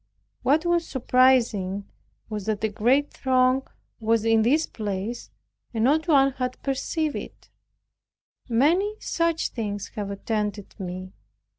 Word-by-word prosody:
What 310 +5 +2
was 345 -1 +1
surprising, 235 -7 +2 0.5
a 215 +1 -1
great 245 +7 +2
throng 255 0 +2 0.3
was 225 0 +1
in 225 -1 +4
this 295 +8 +3
place 210 +2 -4 0.5
and 220 - +1
not 305 +6 +3
one 275 -4 +5
had 255 -1 -4
perceived 295 +3 -1
it. - - -9 1.0
Many 335 - +2
such 335 -1 0
things 205 -3 -4
have 205 -2 -5
attended 205 0 -3
me. 185 0 -6
240 Hz, 115 wpm, -25 LUFS, 210-275 Hz, 1.0 s, one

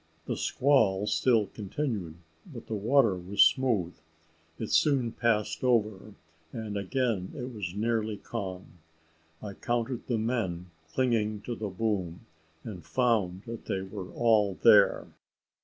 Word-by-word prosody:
The - - -2
squall 105 -8 +2
still 115 0 +2
continued, 105 - -4 0.4
but 120 -4 -9
the - - -6
water 110 0 +3
was 90 +3 +3
smooth. 110 -10 +2 0.6
It 110 - -5
soon 135 -6 +3
passed 110 -1 0
over, 110 -4 0 0.4
and 110 -2 -5
again 100 -1 -1
it 125 0 -6
was 100 -4 -5
nearly 110 -1 -1
calm. 95 -5 -7 0.6
I 100 -2 -6
counted 120 +3 -3
the 120 - 0
men 95 -7 -2 0.2
clinging 110 -3 0
to 120 - -5
the 110 -2 -4
boom, 95 -4 -2 0.4
and 95 -6 -8
found 105 -7 0
that 115 -1 -8
they 95 - -2
were 95 -1 -7
all 110 -5 +3
there. - - +5
110 Hz, 130 wpm, -29 LUFS, 95-120 Hz, 0.6 s, there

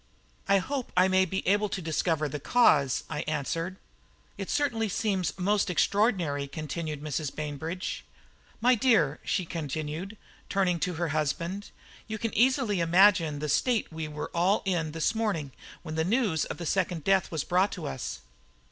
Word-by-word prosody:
"I 200 - +6
hope 260 +7 -3
I 185 +1 +6
may 190 0 +4
be 190 +1 -3
able 205 +2 +3
to 195 - -3
discover 160 -2 0
the 145 +1 -5
cause," 145 - +3
I 155 -2 -4
answered. 165 +4 -2 0.6
"It - - -6
certainly 230 -7 0
seems 190 -7 -1
most 200 +2 +1
extraordinary," 180 -8 +1
continued 155 +1 -5
Mrs. 150 -1 -3
Bainbridge. 155 +4 -4 0.6
"My 250 +3 +5
dear," 215 - +3
she 185 - -1
continued, 160 +5 -4 0.3
turning 185 -3 +1
to 180 -1 -1
her 170 0 -1
husband, 170 +6 -2 0.4
"you 220 -1 -4
can 225 0 -3
easily 245 -4 +3
imagine 170 -2 +4
the 150 +1 -3
state 220 - +1
we 160 -1 -4
were 150 0 -6
all 180 +4 +2
in 170 -5 0
this 165 +5 +1
morning 200 -11 -1 0.3
when 155 -2 -6
the 160 0 +1
news 200 - +1
of - - -6
the 170 - -6
second 175 -2 0
death 195 +1 +3
was 160 -4 -2
brought 185 +3 +2
to 170 -5 -6
us." 130 - -5
175 Hz, 165 wpm, -28 LUFS, 155-200 Hz, 0.6 s, I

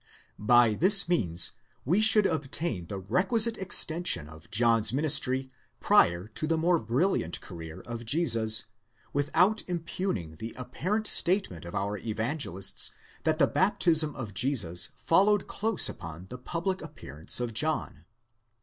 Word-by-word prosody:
By 120 +1 +3
this 195 - +4
means 90 - +1 0.3
we 180 - +1
should 215 -1 +4
obtain 135 - -3
the 100 - -6
requisite 200 - +1
extension 165 - +3
of 80 +1 -15
John's 115 -1 +3
ministry 135 -2 +2 0.3
prior 85 +3 +2
to 155 +8 -5
the 165 0 0
more 170 +1 +1
brilliant 120 - -2
career 80 -2 -11
of 120 0 -8
Jesus, 115 -5 +3 0.5
without 165 +9 +1
impugning 170 - -5
the 115 +7 -9
apparent 180 - -4
statement 175 - +2
of 85 - -9
our 100 +1 -3
evangelists 110 - -3 0.4
that 160 -1 0
the 150 - +3
baptism 160 -3 +2
of 115 -7 -8
Jesus 95 -7 0
followed 190 - +1 0.2
lose 225 +1 +2
upon 85 +2 -8
the 125 - -9
public 175 +7 -4
appearance 75 - -3
of 120 -2 -4
John. 125 - -2
130 Hz, 130 wpm, -27 LUFS, -, 0.5 s, this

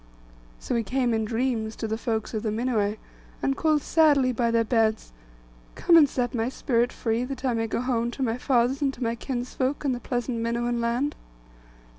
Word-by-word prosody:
So - - -4
he 235 - +2
came 245 +2 0
in 220 -1 0
dreams 225 -1 -1
to 225 - -4
the 220 - -1
heroes 225 -1 -3
of 215 - -2
the 220 - -1
Minuai, 215 -2 0 0.5
and 270 - +1
called 305 -1 +1
sadly 290 -5 +4
by 235 -1 0
their 230 0 +3
beds, 220 - 0 0.6
'Come 340 - +4
and 305 -4 +7
set 245 -2 -2
my 230 0 0
spirit 245 -2 0
free, 230 +1 -1
that 270 0 -6
I 250 - +2
may 225 0 -1
go 225 - -2
home 240 -2 0
to 270 - -1
my 235 0 -1
fathers 255 +2 +1
and 280 -2 +2
to 250 - -5
my 230 0 0
kinsfolk, 255 +3 -3
and 270 - +2
the 245 - -4
pleasant 245 -1 -2
Minuan 235 +1 -1
land. 240 +5 0
240 Hz, 200 wpm, -26 LUFS, 230-260 Hz, 0.6 s, and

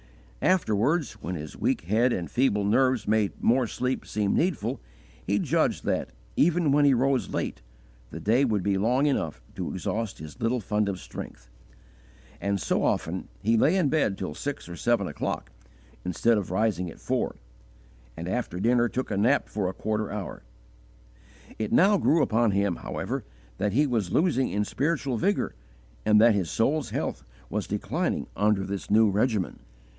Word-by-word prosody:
Afterwards, 150 - +2
when 90 - -4
his 75 -2 -7
weak - - 0
head 110 +9 +2
and 90 -7 -2
feeble 120 -5 +2
nerves 130 +2 +2
made 105 -1 +2
more 125 +1 +3
sleep 125 +3 -2
seem 105 -2 0
needful, 175 - 0 0.4
he - - +1
judged - - +1
that, - - 0 0.3
even 170 -1 +3
when 145 +1 +4
he 140 -2 +5
rose 130 +1 +1
late, - - -3 0.5
the - - -7
day 120 +6 +3
would 105 -7 +1
be 100 0 +1
long 125 +7 +2
enough 80 - -1
to - - -4
exhaust 115 -2 -3
his 80 +10 -10
little 115 +2 +1
fund 105 -1 0
of 95 -2 -3
strength; - - -9 0.9
and 100 0 0
so - - 0
often - - -1 0.2
he 115 +3 +3
lay 150 +10 +4
in 175 -7 +2
bed 130 -10 +1
till 95 -6 -4
six 145 - -5
or - - -9
even 85 - -7
seven - - +2
o'clock, - - -4 0.5
instead 105 +5 +2
of 100 - -5
rising 95 -2 0
at - - -12
four; - - -1 0.8
and 85 - -5
after 95 -3 -2
dinner 120 +3 +3
took 130 -1 -3
a 100 - 0
nap 120 +8 +3
for 100 -3 -2
a - - -5
quarter 110 0 -2
hour. 105 -3 -5 1.2
It 110 -1 -2
now 200 +2 +5
grew 160 0 +3
upon 115 +1 +2
him, 100 -2 +1
however, - - -4 0.4
that 100 0 0
he 145 +6 +4
was 110 -9 -1
losing 155 -7 +2
in 105 +1 0
spiritual 140 -1 -1
vigour, 200 - 0 0.5
and 105 0 +5
that 115 +1 +6
his 95 -5 -1
soul's 135 +2 +1
health - - -3 0.3
was - - -2
declining - - -1
under 105 -1 +2
this 100 0 -5
new 110 +1 +5
regimen. 105 -1 0
110 Hz, 170 wpm, -27 LUFS, 100-130 Hz, 1.2 s, that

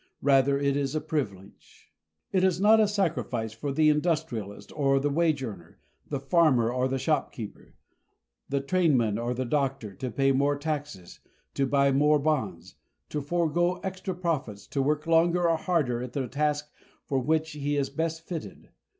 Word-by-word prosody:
Rather 140 0 +4
it 140 0 +1
is 140 0 -1
a - - +2
privilege. 100 - -6 0.4
It 185 -1 +2
is 185 -2 +2
not 215 +3 +6
a 215 - +5
sacrifice 165 - -1
for 140 +6 -4
the 155 +2 +4
industrialist 150 - -2
or 135 -2 +2
the 145 +1 0
wage 155 -2 +1
earner, 100 -9 -8 0.3
the 140 - -2
farmer 135 -6 +3
or 130 0 +1
the 135 0 -1
shopkeeper, 130 -6 -3 0.7
the 140 0 0
trainman 135 - +2
or 120 +1 -2
the 130 +1 -2
doctor, 135 -5 -1
to 130 +7 -5
pay 135 +4 +2
more 140 +2 +2
taxes, 145 - -5 0.3
to 135 - 0
buy 140 0 +3
more 150 +2 +4
bonds, 140 - -2 0.3
to 150 - -2
forego 175 +3 +1
extra 190 -1 -4
profits, 140 - -3
to 140 - -2
work 150 +3 0
longer 170 +1 +3
or 165 - +3
harder 150 -9 0
at 125 -1 -6
the 135 -3 -2
task 150 +1 -1 0.3
for 135 - 0
which 160 +4 0
he 145 0 -2
is 140 -1 -1
best 165 0 -3
fitted. 170 -3 -7
145 Hz, 165 wpm, -27 LUFS, 130-160 Hz, 0.7 s, not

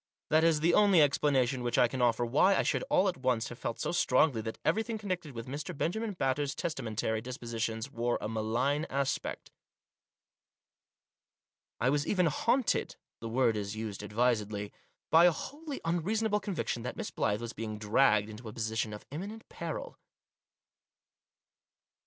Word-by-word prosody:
That 155 +1 +5
is 165 -2 +3
the 170 +2 +3
only 200 -3 +6
explanation 140 -3 +3
which 120 -1 -1
I 125 - +6
can 130 +2 -4
offer 120 0 +3
why 150 +11 +4
I - - +2
should - - 0
all 200 -8 +4
at 185 - -1
once 125 -3 0
have 120 - -9
felt 115 - -4
so - - -1
strongly 135 -6 +3
that 110 0 -5
everything 220 +1 +1
connected 185 -8 -4
with 115 0 -5
Mr. 145 +2 -6
Benjamin 215 +8 -1
Batters' 140 -3 -1
testamentary 110 -7 -2
dispositions 115 0 -4
wore 120 0 0
a - - -3
malign 115 +8 0
aspect. 140 0 -2 2.3
I 125 - +2
was 145 +1 0
even 185 -3 +2
haunted 230 - +1
— - - -63
the 115 - -5
word 120 -1 +2
is 100 0 -3
used 110 -2 -5
advisedly 105 -1 0 0.2
— - - -50
by 165 +2 +7
a 180 - +7
wholly 290 - -6
unreason 180 +7 0
able 210 -1 +2
conviction 190 - -3
that 125 +2 -5
Miss - - -4
Blyth 105 0 0
was 120 0 -5
being 110 -1 -5
dragged 105 0 +3
into 110 +1 -9
a - - -9
position 110 -1 -2
of 105 - -9
imminent 205 +9 -7
peril. - - -6
130 Hz, 165 wpm, -31 LUFS, 115-165 Hz, 2.3 s, by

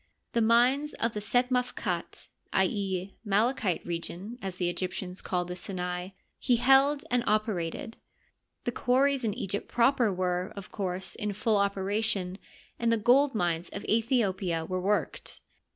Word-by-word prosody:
The 235 - +2
mines 250 +6 +3
of 230 0 -1
the 210 - -3
Set 245 +5 +1
Mafkat 235 -8 -2
— - - -19
i. 190 - +4
e., 190 -1 -2
" - - -48
Malachite 210 -3 +1
Region," 175 +7 -5
as 190 -2 -4
the 180 -1 -1
Egyptians 180 +1 -3
called 180 -1 -1
the 180 - -5
Sinai 180 0 -4 0.2
— - - -45
he 250 - +3
held 270 +4 +4
and 245 -1 +2
operated. 215 -1 -1 0.7
The 240 - -1
quarries 265 +2 +2
in 215 -3 0
Egypt 200 +1 -3
proper 240 -2 +3
were, 180 0 -1
of 200 -2 -9
course, 190 -1 -3
in 210 -2 -3
full 210 +1 +1
operation, 200 -1 0 0.4
and 235 0 +2
the 230 - +3
gold 250 +5 +4
mines 175 -3 0
of 200 - -6
Aethiopia 200 -8 +1
were 185 0 -2
worked. 205 +3 -1
205 Hz, 160 wpm, -29 LUFS, 185-235 Hz, 0.7 s, i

